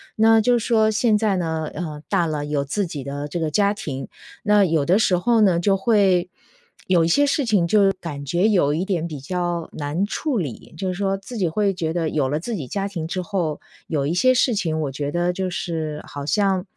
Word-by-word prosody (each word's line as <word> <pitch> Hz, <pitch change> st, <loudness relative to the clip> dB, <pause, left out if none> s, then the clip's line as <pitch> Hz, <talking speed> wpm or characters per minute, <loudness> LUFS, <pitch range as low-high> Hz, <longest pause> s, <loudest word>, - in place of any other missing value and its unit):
那 225 Hz, +1 st, +5 dB
就 240 Hz, +2 st, +3 dB
说 225 Hz, -1 st, +2 dB
现 220 Hz, 0 st, +2 dB
在 210 Hz, -2 st, +1 dB
呢， 160 Hz, -3 st, -2 dB
呃， 155 Hz, -3 st, -5 dB
大 170 Hz, -, +1 dB
了 150 Hz, -2 st, -2 dB
有 145 Hz, -1 st, -1 dB
自 185 Hz, +8 st, -2 dB
己 145 Hz, -4 st, -6 dB
的 140 Hz, +2 st, -5 dB
这 165 Hz, +3 st, -4 dB
个 155 Hz, -1 st, -1 dB
家 200 Hz, +5 st, +2 dB
庭， 140 Hz, -10 st, -6 dB, 0.4 s
那 210 Hz, -1 st, +4 dB
有 160 Hz, -5 st, +1 dB
的 180 Hz, +5 st, +4 dB
时 190 Hz, -4 st, +3 dB
候 230 Hz, +5 st, +2 dB
呢 185 Hz, -5 st, +4 dB
就 195 Hz, +3 st, +2 dB
会 195 Hz, -4 st, +2 dB, 0.6 s
有 180 Hz, -3 st, +4 dB
一 -, -, +2 dB
些 285 Hz, +13 st, +4 dB
事 285 Hz, 0 st, +1 dB
情 205 Hz, -6 st, +3 dB
就 195 Hz, +2 st, +4 dB
感 145 Hz, -5 st, -6 dB
觉 175 Hz, +8 st, +2 dB
有 180 Hz, -9 st, +3 dB
一 165 Hz, +5 st, -1 dB
点 175 Hz, -5 st, -1 dB
比 155 Hz, -4 st, -7 dB
较 175 Hz, +3 st, -3 dB
难 150 Hz, +6 st, -2 dB
处 265 Hz, +5 st, -2 dB
理。 160 Hz, -, -5 dB
就 190 Hz, -, -3 dB
是 185 Hz, -, -1 dB
说 195 Hz, +1 st, -1 dB
自 220 Hz, +6 st, -10 dB
己 185 Hz, -5 st, +1 dB
会 200 Hz, +4 st, +1 dB
觉 165 Hz, -3 st, -2 dB
得 165 Hz, -2 st, -1 dB
有 145 Hz, -4 st, 0 dB
了 150 Hz, +3 st, -1 dB
自 230 Hz, +8 st, -4 dB
己 150 Hz, -9 st, -5 dB
家 195 Hz, +7 st, -2 dB
庭 170 Hz, -5 st, -5 dB
之 185 Hz, +2 st, -3 dB
后， 170 Hz, -5 st, -2 dB, 0.3 s
有 145 Hz, -3 st, -1 dB
一 150 Hz, -, 0 dB
些 255 Hz, +8 st, +4 dB
事 250 Hz, 0 st, +3 dB
情 165 Hz, -7 st, -1 dB
我 145 Hz, -3 st, -2 dB
觉 145 Hz, +1 st, -3 dB
得 175 Hz, +2 st, 0 dB
就 185 Hz, 0 st, -2 dB
是 160 Hz, -4 st, -4 dB
好 145 Hz, -, -7 dB
像 195 Hz, -1 st, +1 dB
175 Hz, 245 characters per minute, -22 LUFS, 155-205 Hz, 0.6 s, 那